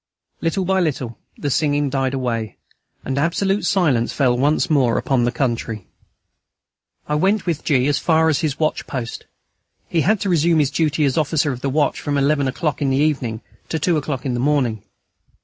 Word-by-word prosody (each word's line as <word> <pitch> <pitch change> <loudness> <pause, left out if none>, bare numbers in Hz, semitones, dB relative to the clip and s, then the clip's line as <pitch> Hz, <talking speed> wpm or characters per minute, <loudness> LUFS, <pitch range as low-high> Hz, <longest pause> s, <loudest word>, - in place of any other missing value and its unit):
Little 175 +3 0
by 190 +1 +2
little 130 -9 -2 0.2
the 145 - -2
singing 145 -1 +1
died 135 -1 0
away, 115 -4 -3 0.5
and 135 +1 -1
absolute 195 +6 0
silence 145 -12 +2
fell 130 -4 +2
once 145 +5 +2
more 130 -7 +2
upon 130 -3 +1
the 120 - +1
country. 115 -5 -2 1.2
I 150 - -2
went 190 +7 +1
with 165 -4 -2
G. 130 -4 +2
as 145 0 +1
far 160 -1 +3
as 155 -3 +2
his 155 -4 -1
watch 155 -1 -1
post. 120 -4 -5 0.6
He 165 - +1
had 205 +7 +2
to 200 - -1
resume 170 -1 +3
his 145 -3 +2
duty 155 0 +1
as 140 +3 +1
officer 150 -1 +1
of 125 -1 -6
the 140 - -1
watch 145 +2 0
from 145 -1 -1
eleven 140 0 +2
o'clock 145 +2 -2
in 140 - +1
the 135 - +1
evening 135 -7 0 0.3
to 160 - -1
two 165 +2 +1
o'clock 145 -3 -3
in 130 - -1
the 120 - -2
morning. 130 -6 +1
145 Hz, 190 wpm, -20 LUFS, 130-160 Hz, 1.2 s, far